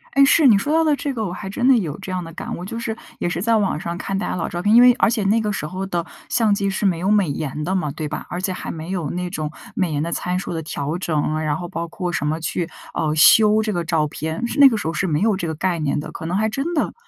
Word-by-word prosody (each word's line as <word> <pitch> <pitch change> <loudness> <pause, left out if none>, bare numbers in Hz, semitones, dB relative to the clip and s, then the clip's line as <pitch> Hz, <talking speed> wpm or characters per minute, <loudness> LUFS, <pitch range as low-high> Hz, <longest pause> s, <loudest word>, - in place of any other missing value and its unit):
诶， 275 0 +7
是。 305 - +4
你 205 - +5
说 290 +9 -1
到 325 0 +4
的 305 -2 +3
这 290 -4 -3
个 225 -4 -2
我 175 - -3
还 190 +1 -6
真 245 +5 -2
的 260 - +7
有 165 -7 -3
这 190 -1 -7
样 185 -1 -2
的 165 - -10
感 - - -5
悟， 180 - -7
就 230 - -6
是 230 -1 -3 0.2
也 175 - 0
是 175 - -3
在 230 +3 +2
网 195 -7 +1
上 170 +1 -4
看 195 +1 -3
大 205 - -2
家 - - -2
老 170 - -2
照 175 - -4
片， 210 +3 +3
因 240 - +9
为 250 - +8
而 230 - +3
且 225 -3 0
那 210 +4 +3
个 210 -2 -1
时 190 - -3
候 185 +5 -4
的 175 -3 -2 0.2
相 225 -3 +2
机 200 -1 0
是 195 +2 -2
没 175 -4 +2
有 190 +3 0
美 205 -6 +3
颜 150 +1 -3
的 185 +4 -1
嘛， 160 -6 0
对 150 +1 -5
吧？ 155 - -5
而 175 - -4
且 190 - -1
还 185 - -6
没 160 +1 -7
有 175 -6 -2
那 180 0 -3
种 155 -4 -3 0.3
美 175 -5 0
颜 145 - 0
的 170 - -3
参 180 +1 -1
数 185 - -4
的 165 - -3
调 150 +2 -3
整， 155 -3 -1
然 150 -1 0
后 175 -1 -6
包 170 0 -4
括 180 +1 -4
什 150 - -1
么 160 +2 -1
去， 165 +1 -2 0.2
呃， 155 -1 0
修 215 +7 +6
这 215 -1 -1
个 175 -3 -2
照 160 -2 +1
片， 160 +9 -4
是 285 - -4
那 280 - +10
个 235 - +2
时 205 - -5
候 165 - -1
是 195 - -1
没 150 +2 0
有 215 -3 +2
这 170 - -3
个 160 - -3
概 175 0 -1
念 145 -2 0
的。 - - -8
可 - - -8
能 175 +3 -2
还 220 +2 +1
真 280 +9 -3
的 300 - 0
180 Hz, 340 characters per minute, -21 LUFS, 160-215 Hz, 0.3 s, 那